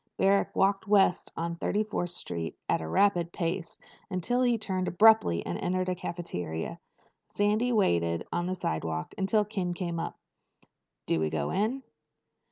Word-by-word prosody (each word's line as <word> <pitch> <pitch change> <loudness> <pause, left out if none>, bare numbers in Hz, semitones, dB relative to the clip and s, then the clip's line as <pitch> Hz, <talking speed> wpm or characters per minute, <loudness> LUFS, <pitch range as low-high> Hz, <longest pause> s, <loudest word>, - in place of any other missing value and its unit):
Barrack 195 +1 +2
walked 195 +2 +2
west 200 -3 +3
on 170 +1 -2
Thirty 210 +5 0
fourth 210 -4 -3
Street 85 - -5
at - - +1
a 80 - -5
rapid 175 - +2
pace 170 0 -3 0.3
until 205 +7 0
he 245 -2 +3
turned 190 -4 -2
abruptly 210 - +5
and 85 - -3
entered 185 +1 -1
a - - +1
cafeteria. 90 - -5 0.5
Sandy 215 +4 +1
waited 85 - +1
on 175 0 0
the 185 - -1
sidewalk 80 - -3
until 205 +2 +2
Ken 190 -4 -3
came 170 -2 -3
up. - - -4 0.9
"Do 80 - +1
we 80 0 +1
go - - -2
in?" 220 +8 0
185 Hz, 155 wpm, -29 LUFS, 165-205 Hz, 0.9 s, abruptly